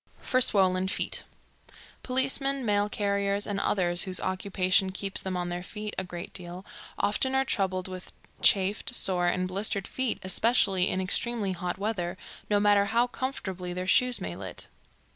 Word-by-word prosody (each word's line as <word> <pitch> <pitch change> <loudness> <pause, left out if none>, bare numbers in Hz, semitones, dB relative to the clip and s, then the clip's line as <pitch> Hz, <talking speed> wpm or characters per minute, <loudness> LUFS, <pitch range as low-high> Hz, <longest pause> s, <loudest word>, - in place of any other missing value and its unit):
For 255 - +1
Swollen 190 -4 +3
Feet. 190 - -1 0.8
Policemen, 270 +1 +1
mail 205 -1 +2
carriers, 200 0 0
and 200 -1 -2
others 175 -4 +2
whose 185 -1 +1
occupation 190 0 +1
keeps 195 +1 -1
them 185 -1 -3
on 175 0 -2
their 175 0 -3
feet 210 +3 -6
a 190 - -2
great 175 -1 -8
deal, 180 +1 -6 0.3
often 235 +6 +1
are 265 0 +3
troubled 190 -6 -1
with 185 -1 -8 0.3
chafed, 200 +5 +3
sore 180 -4 +1
and 185 +1 +1
blistered 195 +1 -1
feet, 260 -3 -1
especially 190 -1 +3
in 185 - -1
extremely 205 +2 -1
hot 180 0 -3
weather, 190 -3 -2 0.3
no 205 -1 +3
matter 205 -1 +4
how 230 +4 +2
comfortably 190 -8 -4
their 180 +1 -3
shoes 250 +5 +3
may - - -5
lit. - - -7
195 Hz, 160 wpm, -28 LUFS, 185-210 Hz, 0.8 s, matter